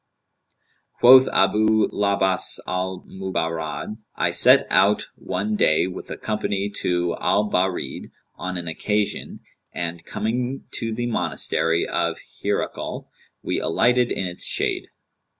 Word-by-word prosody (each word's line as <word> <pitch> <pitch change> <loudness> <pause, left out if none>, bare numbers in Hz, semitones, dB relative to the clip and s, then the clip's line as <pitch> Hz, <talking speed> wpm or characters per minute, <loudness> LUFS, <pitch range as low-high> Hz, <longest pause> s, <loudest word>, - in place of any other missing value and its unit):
Quoth 130 +2 +8
Abu 110 +3 +3
'l - - -5
Abbαs 95 -2 +2
al 90 0 -3
Mubarrad,[FN#198] 85 -1 -4 0.2
"I - - 0
set - - +6
out 95 +4 +3
one 105 +4 -3
day 80 -6 +3
with 90 - -7
a - - -6
company 105 -2 -2
to 90 -1 0
Al 105 +1 +2
Bαrid 90 -7 -1 0.3
on 95 0 -4
an 85 -1 -6
occasion 105 +5 -2 0.3
and, 85 -1 -5
coming 120 +7 -3
to 115 - -4
the 120 +2 -3
monastery 85 -7 0
of - - -1 0.3
Hirakl,[FN#199] - - -3 0.4
we - - -1
alighted 125 +7 +2
in 95 - -1
its 90 0 -4
shade. - - -1
95 Hz, 125 wpm, -23 LUFS, 90-110 Hz, 0.4 s, Quoth